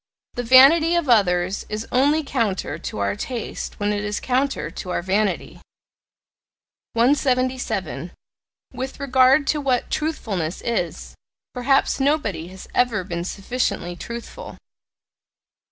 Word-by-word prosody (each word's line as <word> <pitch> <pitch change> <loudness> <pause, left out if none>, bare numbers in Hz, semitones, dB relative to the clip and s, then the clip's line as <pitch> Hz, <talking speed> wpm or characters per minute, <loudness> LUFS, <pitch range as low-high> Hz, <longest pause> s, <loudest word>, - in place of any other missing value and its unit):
The 245 - -3
vanity 275 +8 +6
of 340 -4 0
others 185 -5 +2
is 215 +1 -4
only 290 +5 +3
counter 230 -9 -2
to - - -6
our 100 0 0
taste 240 - -5
when 205 0 0
it 205 0 -2
is 210 0 -2
counter 255 - -1
to 180 - -7
our 175 - -2
vanity. 200 +2 -1 1.3
177. 255 +1 0 0.6
With 260 +1 -5
regard 265 +1 +4
to 300 +1 0
what 260 -3 0
"truthfulness" 200 - -2
is, 220 -8 -3 0.4
perhaps 270 +3 +2
nobody 270 - 0
has 190 +1 -11
ever 235 -6 +1
been 170 -1 -4
sufficiently 195 -3 -2
truthful. 235 - -8
240 Hz, 120 wpm, -22 LUFS, 190-270 Hz, 1.3 s, vanity